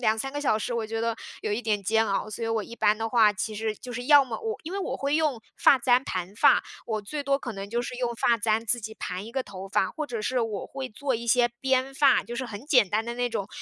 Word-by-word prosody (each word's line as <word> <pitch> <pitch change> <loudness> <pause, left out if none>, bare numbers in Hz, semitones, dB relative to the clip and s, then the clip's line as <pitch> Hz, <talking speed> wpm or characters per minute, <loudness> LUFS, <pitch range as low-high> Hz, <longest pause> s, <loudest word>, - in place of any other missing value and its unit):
2、 220 -3 +2
3 270 +5 -4
个 290 - -3
小 260 -7 +2
时， 230 +3 -3
我 230 -2 -2
觉 225 +1 -3
得， 230 0 -1 0.2
有 215 - -3
一 210 - -1
点 215 -3 0
煎 220 +3 +2
熬。 200 +2 -1
所 230 +2 -4
以 - - -2
我 225 -1 0
一 235 - -10
般 210 -1 +3
的 225 +1 -2
话， 220 -3 +5
其 210 +1 -4
实 220 0 -2
就 245 +4 -9
是 245 +1 -5
要 290 -2 +7
么 240 -4 -5
我 445 -1 -3
因 325 - -7
为 395 - -2
我 390 - -3
会 280 +2 0
用 295 -8 0
发 - - +6
簪 255 -1 +3
盘 185 -4 -4
发， - - +5 0.2
我 215 -2 -2
最 285 +8 -5
多 275 0 +2
可 265 -3 -6
能 195 0 -6
就 235 +3 -1
是 245 - -6
用 245 -1 -1
发 235 0 +2
簪 220 +1 +1
自 240 +2 0
己 220 0 -7
盘 185 -1 -5
一 230 - -10
个 265 0 -1
头 195 -3 -9
发， 210 +2 +1
或 305 -1 -4
者 230 -4 -4
是 255 +4 0
我 220 -4 -2
会 270 -1 -6
做 265 +4 -3
一 235 +1 -7
些 240 +1 +4
编 265 0 +1
发， 270 -1 +4
就 240 - -7
是 260 0 -3
很 220 +1 -8
简 250 -9 +5
单 215 +4 0
的 235 +1 -4
那 245 0 0
种， 205 -4 -3
230 Hz, 305 characters per minute, -26 LUFS, 215-260 Hz, 0.2 s, 要